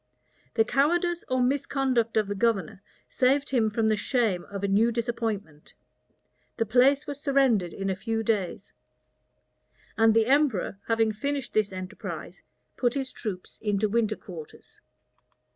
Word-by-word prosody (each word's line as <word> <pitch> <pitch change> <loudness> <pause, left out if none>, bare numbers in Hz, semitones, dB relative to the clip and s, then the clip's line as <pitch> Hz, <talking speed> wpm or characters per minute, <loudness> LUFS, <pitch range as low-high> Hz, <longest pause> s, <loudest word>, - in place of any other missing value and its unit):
The 225 - +4
cowardice 345 +8 +1
or 255 -1 +2
misconduct 260 -3 0
of 215 -2 +2
the 205 - -2
governor 200 -4 0 0.3
saved 270 - +1
him 230 -5 +2
from 220 +1 0
the 215 - +3
shame 215 -5 0
of 200 -1 -7
a - - +2
new 215 +4 +3
disappointment. 225 -9 -4 0.8
The 225 - +1
place 260 +6 +4
was 285 0 -6
surrendered 265 - +2
in 195 +3 -4
a 190 - 0
few 225 +4 -2
days; 205 -5 -2 1.2
and 225 0 +4
the 225 -1 +4
emperor, 260 -8 +1
having 225 -1 +2
finished 275 +4 -3
this 215 -2 +1
enterprise, 185 +2 -7 0.4
put 245 0 +1
his 270 -2 -2
troops 190 -5 -6
into 210 0 +1
winter 220 0 +1
quarters. 165 -7 -12
225 Hz, 145 wpm, -27 LUFS, 205-260 Hz, 1.2 s, The